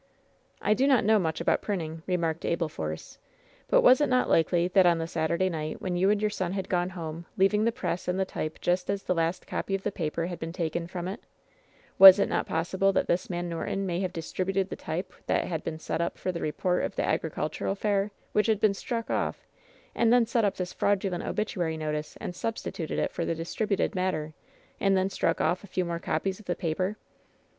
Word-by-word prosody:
"I 210 - +4
do 265 +5 +2
not 265 -5 +4
know 215 0 +5
much 160 -4 -1
about - - +2
printing," 165 -6 -3
remarked 170 -3 -1
Abel 170 -1 0
Force; 80 - -6 0.5
"but - - +5
was 255 +3 +7
it 295 - +3
not 255 0 +3
likely 170 +1 +3
that 185 0 +5
on 170 -1 +4
the 165 - -2
Saturday 170 +3 0
night, 155 -3 -3
when 185 -2 -2
you 185 +3 +3
and 210 0 +3
your 210 0 0
son 185 -2 -2
had 195 -1 -3
gone 180 0 +1
home, 165 0 -6
leaving 210 +3 +3
the 230 - +3
press 185 -5 -3
and 180 +1 0
the 190 - +2
type 155 -4 -5
just 180 +1 0
as 200 0 -1
the - - +1
last 165 +1 -1
copy 195 - -2
of 195 - -4
the 210 - -1
paper 165 -2 -2
had 175 -1 -5
been 165 +1 -5
taken 170 -1 -2
from 175 0 -5
it, 195 +5 -5 0.8
was 190 0 +12
it 200 - +1
not - - 0
possible 190 +4 +1
that - - +1
this 180 +2 0
man 175 -1 -2
Norton 175 +3 -2
may 175 -2 -1
have 185 -2 -1
distributed 185 +3 -2
the - - -4
type 170 +4 -5
that - - +1
had 160 -3 -3
been 160 - -4
set 160 - -3
up 170 - -2
for 185 - -2
the 170 - -5
report 180 +4 0
of - - -3
the - - 0
agricultural 155 +4 -1
fair 200 0 0 0.2
which 210 - +2
had 220 -2 +2
been 215 -2 +3
struck 230 +3 -4
off, - - -2 0.5
and 230 -1 +3
then 245 -1 +5
set 230 0 +1
up 200 -2 +1
this 180 -1 -4
fraudulent 195 -3 0
obituary 175 -6 -2
notice 150 -1 -4
and 175 - -5
substituted 205 -7 -4
it - - 0
for 170 - -3
the 165 - -1
distributed 200 +6 -1
matter, 180 -5 -1 0.5
and 195 -1 +3
then 190 +1 +1
struck - - 0
off 180 - +1
a - - -10
few 185 -1 -1
more 170 -1 -3
copies 185 +5 -2
of 215 - -16
the 175 - 0
paper 185 +4 -2
180 Hz, 225 wpm, -28 LUFS, 165-195 Hz, 0.8 s, was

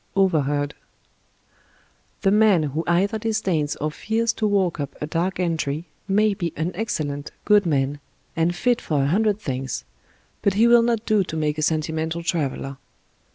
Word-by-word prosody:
OVERHEARD 145 -6 +2 1.5
The 195 - +3
man 210 -5 +5
who 150 +2 -2
either 195 +5 +2
disdains 195 -9 0
or 155 +1 -2
fears 225 +7 0
to 215 - 0
walk 190 -5 +1
up 140 -1 -4
a - - -2
dark 170 +5 -1
entry 160 -3 -1 0.2
may 210 +1 +3
be 170 -4 -3
an 160 +3 -2
excellent, 150 -9 -3 0.2
good 210 -3 +4
man, 140 -1 0 0.4
and 165 +2 +1
fit 245 +5 +1
for 145 -3 0
a 140 - +1
hundred 210 +3 +2
things, 135 -7 -4 0.6
but 200 -2 +1
he 220 +3 +5
will 235 0 +7
not 230 -1 0
do 215 -3 +3
to 160 - -5
make 150 0 -1
a - - 0
sentimental 160 +2 -1
traveler. 140 -5 -2
170 Hz, 160 wpm, -23 LUFS, 150-210 Hz, 1.5 s, will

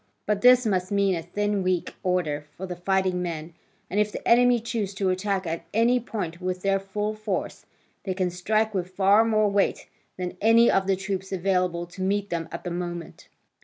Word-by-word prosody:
But 210 -1 0
this 250 0 +6
must 185 -3 0
mean 200 -1 +2
a 170 - -2
thin 205 +4 -1
weak 185 -2 -1
order 155 -5 -1
for 190 - -5
the 180 -1 -5
fighting 185 0 0
men, 165 -2 -5 0.3
and 200 - -1
if 210 0 +2
the - - -6
enemy 245 0 +5
choose 220 -4 -3
to 190 -1 +1
attack 190 0 -1
at 165 0 -3
any 240 +3 +4
point 185 -7 -5
with 185 0 -3
their 195 0 +2
full 205 +2 -3
force, 215 -3 -4 0.4
they 190 -2 -3
can 185 -2 0
strike 215 +5 0
with 185 -2 -2
far 195 +3 +4
more 215 -2 +2
weight 200 -1 +1 0.3
than 180 0 -5
any 230 +2 +6
of 195 0 +1
the 195 - +3
troops 190 0 -4
available 180 -2 0
to 180 +2 -11
meet 200 +1 -1
them 165 -1 -3
at 170 - -6
the 175 - -4
moment. 175 -1 -6
190 Hz, 200 wpm, -25 LUFS, 180-210 Hz, 0.4 s, this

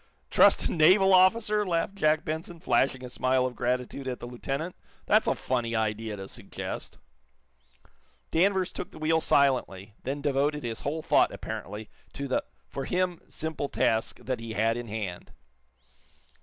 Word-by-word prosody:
"Trust - - +6
a - - 0
naval 190 +4 +5
officer?" 210 +3 +4
laughed 175 0 -1
Jack 155 -5 +2
Benson, 160 +2 -4
flashing 130 -1 +1
a - - -5
smile 130 +1 +1
of 125 -1 -3
gratitude 125 +2 -2
at 125 -1 -3
the - - -7
lieutenant. 135 +7 -4 0.3
"That's - - +3
a - - +2
funny 120 -2 -1
idea 110 0 -1
to 95 0 -7
suggest." - - -6 1.3
Danvers 190 +2 +2
took - - -6
the - - -14
wheel 160 +1 +2
silently, 120 -10 +1
then 135 +3 -3
devoted 145 +1 0
his 115 -2 -4
whole 155 +3 -3
thought, - - +4
apparently, 105 +2 -6 0.3
to 140 0 -4
the 130 - 0 0.2
for 135 -1 -5
him 180 -1 -1
simple 155 -3 -4
task 110 0 +1
that 130 -2 -2
he 115 -1 -6
had 115 +1 +1
in 120 0 -5
hand. 105 -5 -5
135 Hz, 155 wpm, -28 LUFS, 120-160 Hz, 1.3 s, Trust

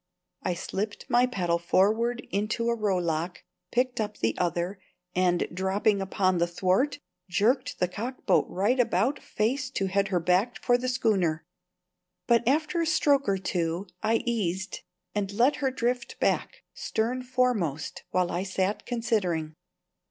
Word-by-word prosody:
I 180 - -1
slipped 205 +4 -4
my 245 +1 +5
paddle 175 -7 0
forward 220 +7 +2
into 215 +4 0
a - - +1
rowlock, 180 -5 -1 0.3
picked 250 -1 +1
up 210 0 -4
the 115 0 0
other, 175 +3 -1 0.3
and, 180 -1 +2
dropping 195 +2 +1
upon 185 -1 +1
the 170 - +2
thwart, 185 +10 +1 0.3
jerked 245 +8 +1
the 180 - +1
cockboat 235 +8 0
right 210 +8 +1
about 245 +4 +2
face 255 +5 -1
to 195 - -1
head 195 +1 +1
her 185 -2 +1
back 180 +8 +1
for 245 - +4
the 250 +1 0
schooner. 195 -10 +1 0.8
But 235 -1 +3
after 310 +5 +2
a 330 - 0
stroke 290 -5 +3
or 195 - +2
two 175 -1 -2 0.2
I 225 +2 +1
easied 190 -5 -1 0.3
and 205 -2 -1
let 245 +7 +3
her 270 - +1
drift 250 0 -2
back - - 0
stern 240 +4 -1
foremost 245 - 0
while 180 -1 +1
I 175 - -1
sat 190 +1 -1
considering. 200 -10 -1
205 Hz, 145 wpm, -27 LUFS, 180-245 Hz, 0.8 s, my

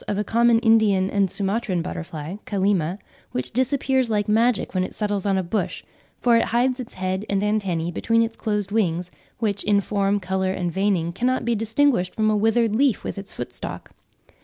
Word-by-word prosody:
of 205 - -1
a 210 - 0
common 235 +1 +3
Indian 215 -5 +3
and 200 -2 +2
Sumatran 195 -2 -1
butterfly 165 0 -6
(Kallima) 190 -4 0 0.4
which 125 - -3
disappears 260 0 +1
like 210 -2 0
magic 225 +2 +2
when 185 -1 +1
it - - -6
settles 205 -2 -1
on 195 -1 +2
a 190 - 0
bush; 185 +5 -2 0.4
for 240 -1 +4
it 230 - +3
hides 250 +3 +1
its 250 -1 -8
head 185 +1 -2
and 200 0 0
antennae 190 -6 0
between 230 +6 +2
its 225 0 -3
closed 210 -2 -2
wings, 180 -5 0 0.3
which, 205 -3 -1
in 205 -1 +3
form, 200 0 0
colour 190 0 -1
and 175 -2 -2
veining, 185 -2 0
cannot 250 +5 0
be 235 - +2
distinguished 225 -3 +1
from 215 0 +2
a - - +2
withered 225 +1 +2
leaf 265 -2 +2
with - - -4
its 195 - -9
footstalk. - - -7
205 Hz, 185 wpm, -23 LUFS, 190-225 Hz, 0.4 s, for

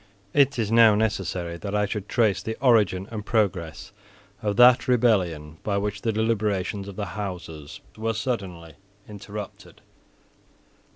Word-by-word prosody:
It 140 -1 +3
is 110 -2 -1
now 115 -2 +6
necessary 95 -5 -2
that 100 +3 -5
I 105 0 +2
should 100 0 -5
trace 110 -5 +2
the 110 - -5
origin 105 -7 +3
and 110 -2 -5
progress 95 -5 -1 0.5
of 105 -1 -1
that 125 +1 +6
rebellion 90 -11 +1
by 100 -2 -1
which 105 0 -3
the 115 - 0
deliberations 105 -3 -1
of 100 - -8
the 105 0 -5
Houses 80 -6 -7
were 110 +1 -2
suddenly 95 -9 -4 0.3
interrupted. 105 0 -9
105 Hz, 135 wpm, -25 LUFS, 95-110 Hz, 0.5 s, now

